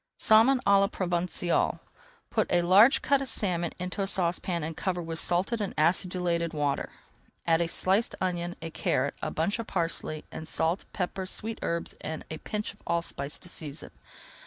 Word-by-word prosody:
SALMON 230 +5 +6
À 200 0 +6
LA 195 - +4
PROVENÇALE 175 -2 0 0.5
Put - - +1
a 175 - +4
large 200 +9 +6
cut 280 -1 +3
of 270 - -3
salmon 175 -6 +1
into 180 +2 -4
a 195 - 0
saucepan 175 -2 0
and 160 +1 -4
cover 180 +1 -2
with 165 -1 -3
salted 195 +6 0
and 200 - -3
acidulated 170 0 +1
water. 145 -2 -1 0.6
Add 165 0 +3
a 170 - +1
sliced 190 +6 +1
onion, 175 -1 -2
a 165 - -5
carrot, 140 -2 0
a - - -2
bunch 185 +8 -1
of 230 - -4
parsley, 165 -3 -2
and 160 - -7
salt, 165 +4 0
pepper, 185 0 -3
sweet 220 +3 -3
herbs, 170 0 -1
and 155 0 -5
a 155 - -5
pinch 210 -1 -4
of 210 - -25
allspice 170 -4 -2
to - - -10
season. 150 -3 -5
175 Hz, 175 wpm, -28 LUFS, 165-195 Hz, 0.6 s, SALMON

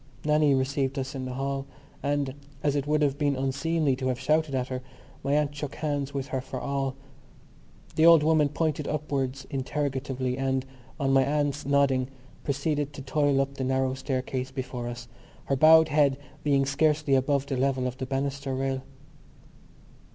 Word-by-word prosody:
Nannie 150 -2 +4
received 135 +1 0
us 135 +1 -3
in 130 -2 -4
the 130 -1 -5
hall; 135 0 -2 0.3
and, 140 -2 0 0.3
as 145 -1 +2
it 145 0 -1
would 150 0 +2
have 140 0 +1
been 145 -2 +2
unseemly 140 +2 0
to 130 0 -2
have 125 -1 -1
shouted 155 -2 +1
at 130 0 -1
her, 130 -1 -3 0.4
my 140 +1 0
aunt 145 -1 +2
shook 145 -1 -5
hands 145 -2 -2
with 140 -1 -4
her 130 0 -1
for 130 - -6
all. 135 -1 -2 1.0
The 160 +1 +5
old 165 -3 +8
woman 155 -2 +4
pointed 150 0 -1
upwards 140 -3 -2
interrogatively 135 -2 -2
and, 135 -1 0 0.3
on 135 -2 +1
my 135 0 +6
aunt's 145 0 -1
nodding, 140 -2 +3 0.4
proceeded 145 +1 -1
to 135 - -8
toil 145 0 +2
up 135 0 0
the 130 - -2
narrow 130 0 +1
staircase 130 -1 -3
before 130 -2 -5
us, 120 0 -6 0.4
her 135 - +1
bowed 160 +3 +7
head 145 -2 +3 0.3
being 140 -2 +3
scarcely 150 +1 +2
above 135 +1 +2
the 140 - -2
level 130 0 +1
of 125 0 -3
the 130 - -3
banister 135 0 -2
rail. 135 0 -1
140 Hz, 175 wpm, -27 LUFS, 130-145 Hz, 1.0 s, old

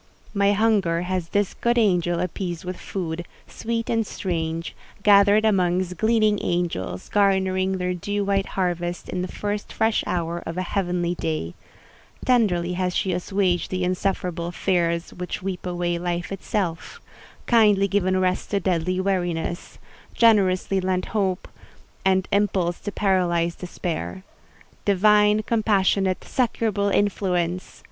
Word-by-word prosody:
My 200 -1 +3
hunger 200 -6 +2
has 180 -2 -2
this 205 +1 0
good 240 0 0
angel 175 -6 +2
appeased 180 -1 -4
with 185 0 -4
food, 170 -3 -4 0.2
sweet 230 0 -3
and 225 -1 +1
strange, 165 -4 -3 0.3
gathered 205 +1 +6
amongst 180 -3 +1
gleaning 220 -2 +3
angels, 170 - -2
garnering 190 -1 +2
their 180 0 -1
dew 205 +3 -2
white 195 -1 +1
harvest 175 -1 -2
in 180 - -2
the 180 - -2
first 205 +2 -4
fresh 220 0 +1
hour 170 -1 -2
of 165 +2 -6
a 185 - 0
heavenly 175 -2 -1
day; 155 - -3 0.7
tenderly 185 -9 +2
has 180 0 -1
she 190 - 0
assuaged 180 0 0
the 185 -1 -2
insufferable 180 -2 -1
fears 170 -2 0
which 180 0 -5
weep 185 -1 -4
away 175 -1 -1
life 175 +1 -3
itself—kindly 200 +2 0
given 185 -1 +1
rest 185 0 0
to 200 - +1
deadly 180 0 0
weariness—generously 185 +2 0
lent 185 0 0
hope 190 -4 0 0.6
and 190 -1 +2
impulse 190 -4 +1
to 205 - -5
paralyzed 175 -4 +1
despair. 160 - -4 0.6
Divine, 210 +2 +4
compassionate, 200 -4 +1
succourable 215 -5 0
influence! 185 -3 0
185 Hz, 125 wpm, -23 LUFS, 175-200 Hz, 0.7 s, gathered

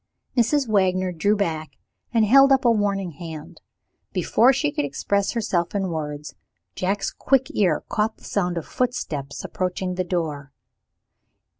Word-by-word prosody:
Mrs. 255 +3 +2
Wagner 185 -3 +2
drew 190 +5 +1
back, 160 -7 -3 0.3
and 225 -2 +3
held 275 +5 +6
up 265 -1 +4
a 235 - +6
warning 200 -4 0
hand. 160 +1 -9 0.5
Before 245 +3 +4
she 145 - 0
could 145 - -1
express 200 +8 -1
herself 190 -6 -1
in 195 -2 0
words, 150 -2 -5 0.4
Jack's 195 +2 -1
quick 265 -1 +1
ear 180 -7 +2
caught 215 +1 -1
the - - -23
sound 180 -3 -1
of 165 - -4
footsteps 160 - -3
approaching 185 0 -2
the 185 0 -1
door. 155 -6 -3
185 Hz, 145 wpm, -23 LUFS, 160-215 Hz, 0.5 s, held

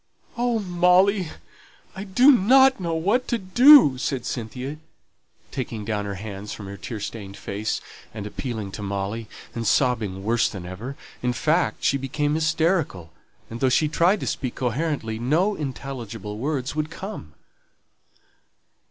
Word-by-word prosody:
"Oh, 240 -1 +1
Molly, 180 0 +3 0.7
I 190 +2 -6
don't 240 +1 +5 0.3
know 170 -3 -2
what 205 +10 +1
to 235 - 0
do," 225 - +7
said 130 -2 -2
Cynthia, 125 +5 -5 0.7
taking 115 -5 -4
down 105 -1 -2
her 100 -1 -4
hands 100 0 -7
from 105 - -8
her 100 +1 -7
tear 100 +5 -6
stained 100 -1 -7
face, 105 +2 -3 0.3
and 105 -2 -7
appealing 110 -2 -5
to 105 - -7
Molly, 100 +3 -3 0.3
and 115 -2 -3
sobbing 110 -8 +1
worse 115 +3 +2
than 95 -4 -8
ever; 110 +10 -7 0.2
in 125 0 0
fact, 155 -3 0
she 140 - +3
became 145 +2 -1
hysterical, 155 - 0 0.3
and 115 - -7
though 130 - +3
she 150 +5 +3
tried 175 +7 +2
to - - -3
speak 130 -3 -3
coherently, 125 -3 -2
no 160 - +2
intelligible 120 - -6
words 140 0 -2
would 155 0 -1
come. 165 - -8
130 Hz, 145 wpm, -24 LUFS, 105-170 Hz, 0.7 s, do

